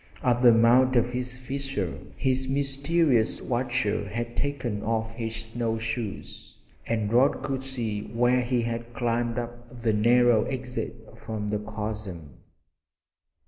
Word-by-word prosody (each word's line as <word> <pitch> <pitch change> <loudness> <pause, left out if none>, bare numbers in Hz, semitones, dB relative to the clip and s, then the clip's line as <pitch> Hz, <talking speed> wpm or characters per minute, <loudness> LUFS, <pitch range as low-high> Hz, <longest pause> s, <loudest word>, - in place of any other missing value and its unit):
At 125 -2 +2
the 120 -2 +8
mouth 120 +3 +5
of 120 0 +3
this 125 0 -1
fissure 135 -7 -3 0.2
his 130 0 +2
mysterious 140 -2 +2
watcher 120 -4 -1
had 120 +2 -4
taken 125 -7 -2
off 110 0 -1
his 115 -1 -4
snow 115 0 -2
shoes 110 -2 -5 0.3
and 110 -2 -1
Rod 130 +2 +3
could 135 -1 -2
see 115 -6 -3
where 125 +2 +2
he 120 -1 0
had 115 0 -4
climbed 120 -1 0
up 120 +1 -6
the 110 -2 +3
narrow 120 +1 +4
exit 125 -1 -5
from 105 -2 -5
the 105 0 0
chasm. 105 - -6
120 Hz, 135 wpm, -27 LUFS, 110-125 Hz, 0.3 s, the